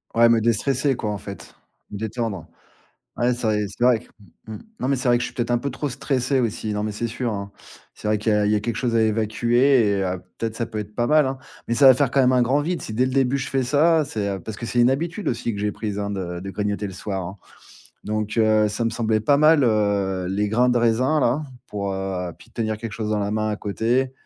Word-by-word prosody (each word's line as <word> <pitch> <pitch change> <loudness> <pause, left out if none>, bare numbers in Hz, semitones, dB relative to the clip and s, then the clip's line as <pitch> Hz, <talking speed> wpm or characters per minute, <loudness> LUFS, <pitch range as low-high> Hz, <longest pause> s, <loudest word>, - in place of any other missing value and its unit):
Ouais 115 0 +6
me 115 -1 +4
déstresser 130 +5 +1
quoi 105 -3 -3
en 105 - -3
fait, 100 0 -10 0.3
me 105 - -6
détendre. 110 -5 -3 0.7
Ouais, 120 +1 +2
c'est 120 0 -7
vrai 105 -1 +1
c'est 100 +4 -5
vrai 125 -2 +5
q - - -19 0.4
mmh, 110 - -6 0.2
non 130 - -1
mais 140 - +2
c'est 125 -1 -1
vrai 120 - +5
que - - -3
je - - -1
suis - - -8
peut-être 120 0 -1
un 120 - +3
peu 140 +4 -3
trop 140 +3 -4
stressé, 130 +1 0
aussi. 110 -2 -2
Non 105 - -2
mais 105 -1 -3
c'est 115 +3 -2
sûr, 120 0 -3
hein. 100 0 -5 0.4
C'est - - -7
vrai 105 0 +2
qu'il 110 +1 0
y - - +3
a 105 - +2
il 105 - +2
y 105 - +3
a 105 - 0
quelque 115 0 -3
chose 120 -3 -1
à 115 - +4
évacuer 115 +3 +2
et - - 0
heu, 90 -1 -2 0.2
peut-être 115 -1 -3
ça 115 - -2
peut 110 -1 -5
être 105 0 -8
pas 120 0 0
mal, 155 +1 +4
hein, 130 0 -3 0.3
mais 115 - 0
ça 135 +3 +7
va 130 - +10
faire 135 0 +2
quand 135 - +3
même 130 0 +4
un 125 -1 +3
grand 135 +5 +2
vide 175 +3 -2
si 110 - -6
dès 125 +4 +2
le 130 - -2
début 135 0 +2
je 135 - -4
fais 135 -1 0
ça 150 +4 +3
c'est, 105 -5 -3
heu, 95 - -3
parce 105 +4 -7
que 115 - -6
c'est 120 +1 -1
une 120 - +5
habitude 165 +8 -2
aussi 115 -1 -1
que 100 - -5
j'ai 105 0 -1
prise, 105 -1 -4
hein, 100 0 -2
de 90 -3 -4
de 95 +2 -7
grignoter 105 0 -2
le 95 - -8
soir, 95 0 -4
hein 95 +3 -9 0.7
donc, 110 +1 -3
heu, 110 -1 +4
ça 110 +3 -2
me 115 - +1
semblait 110 -1 0
pas 140 +7 +3
mal, 155 0 +5
heu, 100 -4 +1
les 100 +2 0
grains 120 +4 +2
de 125 - +2
raisin 125 +6 +2
là 130 +4 +1 0.3
pour 100 -1 -3
heu, 95 -2 -3
puis 85 - -18
tenir 110 -2 -2
quelque 115 -2 -6
chose 110 -1 -3
dans 105 - +1
la 100 0 -1
main 110 0 0
à 105 - -2
côté 120 +6 0
115 Hz, 275 wpm, -23 LUFS, 105-125 Hz, 0.7 s, va